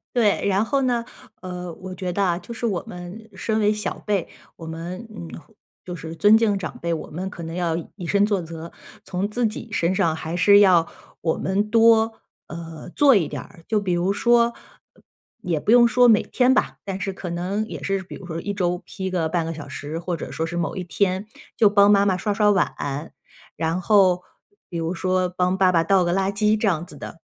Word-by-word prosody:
对， 220 -5 +2
然 200 +1 +2
后 275 +4 0
呢， 245 -2 +1 0.4
呃， 180 -2 -6
我 185 +2 -9
觉 185 -1 -4
得 200 - +1
啊， 175 -3 +1
就 185 +6 -9
是 235 +1 -2
我 195 -5 -2
们 180 +5 -9
身 220 +3 -1
为 210 0 +3
小 210 0 -4
辈， 200 -5 0 0.3
我 165 - -9
们， 170 +6 -6
嗯， 200 -6 -8 0.6
就 180 - -6
是 165 -1 -7
尊 210 +5 +6
敬 220 -3 +2
长 - - -6
辈， 170 0 -1
我 160 - -5
们 180 +5 -5
可 175 - -9
能 165 0 -6
要 175 -2 0 0.2
以 185 -4 -7
身 200 +4 +2
作 205 -2 +1
则， 165 -1 -8 0.3
从 185 +2 -2
自 230 +2 0
己 220 +2 -7
身 185 -2 +1
上 165 -3 +1
还 160 +1 -5
是 200 +3 +6
要 180 -5 +5 0.3
我 160 -1 +1
们 200 +2 -1
多， 225 0 +4 0.3
呃， 165 0 -8
做 280 -3 +6
一 180 -6 +2
点 - - -5
儿。 165 - -15
就 215 -2 +1
比 190 - -2
如 175 +3 +1
说， 235 +2 +3 0.9
也 175 -7 -1
不 210 - 0
用 235 0 +7
说 250 +1 +5
每 220 -3 +6
天 255 0 +2
吧， - - 0
但 195 -1 -4
是 195 - -2
可 185 -2 -7
能 185 +5 -2
也 - - -7
是 195 -1 -1
比 190 - -11
如 180 - -9
说 165 -2 -4
1 205 +4 -4
周 180 -3 0
批 190 -1 -5
个 175 -3 0
半 165 +1 0
个 - - -3
小 155 -3 -8
时， 145 +2 -6
或 175 +1 -3
者 165 - -7
说 160 - -2
是 170 +1 -5
某 170 -1 -2
一 185 - -3
天 185 +2 0 0.3
就 225 - +6
帮 200 0 +6
妈 200 -1 +5
妈 190 -2 +2
刷 205 +3 -2
刷 210 0 +3
碗， 150 -5 -2 0.4
然 165 +3 -1
后 185 -3 +4 0.5
比 170 - -5
如 165 +2 -2
说 185 0 0
帮 180 +1 0
爸 190 -1 +4
爸 165 -2 +3
倒 195 0 +3
个 175 0 0
垃 195 +1 +1
圾 210 +1 +2
这 215 - +1
样 170 -4 0
子 160 - -11
的。 165 - -9
185 Hz, 235 characters per minute, -23 LUFS, 170-210 Hz, 0.9 s, 用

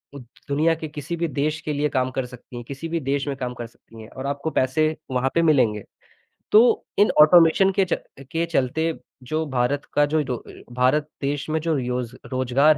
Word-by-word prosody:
उ 140 - -7 0.3
दुनिया 155 +4 +2
के 160 -1 -6
किसी 150 +3 -5
भी 170 0 -1
देश 150 +1 -1
के 150 - -3
लिए 150 +1 0
काम 130 -2 0
कर 130 0 -2
सकती 125 0 -13
हैं, 120 - -6
किसी 140 +6 -6
भी 165 0 -1
देश 140 0 -2
में 140 - -2
काम 125 -1 -4
कर 120 -1 -7
सकती 115 -1 -16
हैं 110 - -11
और 130 - -8
आपको 140 +3 -2
पैसे 155 +4 +2 0.2
वहाँ 130 +1 +1
पे 170 - +4
मिलेंगे। 125 -10 +3 0.7
तो 215 - +8 0.4
इन 205 - +5
ऑटोमेशन 170 +4 +6
के 190 0 +2
च 175 - -1 0.4
के 165 +1 0
चलते 160 +1 0 0.3
जो 155 +5 -2
भारत 130 +3 0
का 145 - +4
जो 155 +1 0
दो 125 -2 -3
अ, - - -13 0.2
भारत 130 +4 +2
देश 145 +2 -2
में 160 +1 0
जो 165 -1 0
रियोज़ 125 -2 -3 0.2
रोज़गार 130 +4 +3
145 Hz, 210 wpm, -23 LUFS, 130-160 Hz, 0.7 s, तो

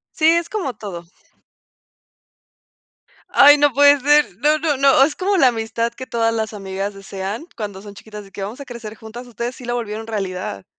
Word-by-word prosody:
Sí, 315 - 0
es 335 +1 +3
como 295 - -3
todo. 180 -5 -8 2.3
Ay, 290 +1 +7
no 290 -1 +4
puede 285 +2 +5
ser. 295 +2 +4
No, 305 +1 +3
no, 305 -2 0
no, 275 -1 +5
es 290 - 0
como 390 +1 0
la 270 - +5
amistad 230 0 -3
que 260 +1 -9
todas 230 0 0
las 220 -1 -3
amigas 195 0 -5
desean 195 - -6
cuando 205 -4 -6
son 205 -1 -10
chiquitas, 210 0 -11
de 195 - -17
que 200 - -8
vamos 215 +8 -6
a 280 - -8
crecer 230 -3 -9
juntas. 230 +3 -10
Ustedes 240 +2 -5
sí 250 - -11
lo 240 0 -2
volvieron 220 -1 -5
realidad. 185 - -4
230 Hz, 190 wpm, -20 LUFS, 205-280 Hz, 2.3 s, Ay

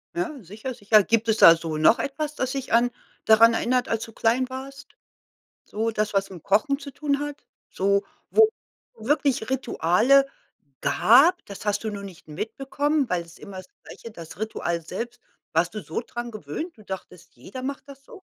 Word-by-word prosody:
Ja, 330 -6 -3
sicher, 215 +8 -7
sicher. 210 -1 +4
Gibt 230 +2 +1
es 220 - +3
da 165 - +9
so 165 -1 -4
noch 155 +9 +5
etwas, 300 +2 -3
das 260 -2 -2
dich 270 -3 -4
an 235 +1 +4 0.4
daran 225 +1 +7
erinnert, 250 +2 +1
als 225 0 -1
du 225 - -9
klein 240 +4 +1
warst? 270 +2 -9 0.7
So 220 +2 -2
das, 215 -1 -1
was 195 0 0
mit 180 -3 -10
dem - - -38
Kochen 220 - +2
zu 280 -1 -8
tun 280 0 -1
hat? 290 0 -6 0.3
So, 200 +1 +1 0.3
wo 440 -1 +6 0.5
wirklich 265 0 0
Rituale 265 +2 +3 0.5
gab, 285 - +4
das 200 0 -9
hast 205 +1 -1
du 220 - -1
nur 200 -1 -6
nicht 190 -4 -11
mitbekommen, 270 - -1
weil's 170 -3 -4
immer 195 -2 -10
das 185 0 -10 0.2
Gleiche, 230 - -11
das 170 -4 -11
Ritual 200 -5 -2
selbst. 235 +9 -6 0.3
Warst 165 +4 +1
du 215 - -4
so 160 - -4
dran 240 0 -6
gewöhnt? 215 - -6
Du 215 - -16
dachtest, 190 -3 -9
jeder 195 - -9
macht 270 0 -5
das 275 -1 -14
so? 440 -6 -14
225 Hz, 185 wpm, -24 LUFS, 200-275 Hz, 0.7 s, da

